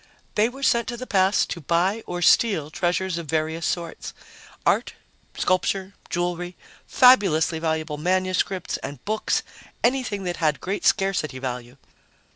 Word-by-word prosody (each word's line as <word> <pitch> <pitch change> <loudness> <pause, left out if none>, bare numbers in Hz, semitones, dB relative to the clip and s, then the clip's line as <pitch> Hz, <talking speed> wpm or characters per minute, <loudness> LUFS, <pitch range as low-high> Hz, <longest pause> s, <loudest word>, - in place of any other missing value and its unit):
"They 215 +2 +3
were 270 +3 -10
sent 235 -3 +3
to 240 -2 -4
the 255 - -6
past 195 -3 +2
to 170 - -4
buy 180 +8 +1
or 175 0 -3
steal 170 -8 +3
treasures 180 +1 -1
of 165 - -7
various 160 +1 -1
sorts 170 -2 -4 0.5
art, - - +1 0.4
sculpture, 190 +1 0 0.2
jewelry, 175 0 -2 0.3
fabulously 190 - +5
valuable 160 -2 -2
manuscripts 185 +2 0
and 140 -2 -8
books, 215 +1 0 0.4
anything 240 -6 0
that 175 -1 -3
had 155 -3 +1
great 195 +2 -2
scarcity 190 -8 +1
value." 125 -1 -5
180 Hz, 135 wpm, -24 LUFS, 160-200 Hz, 0.5 s, fabulously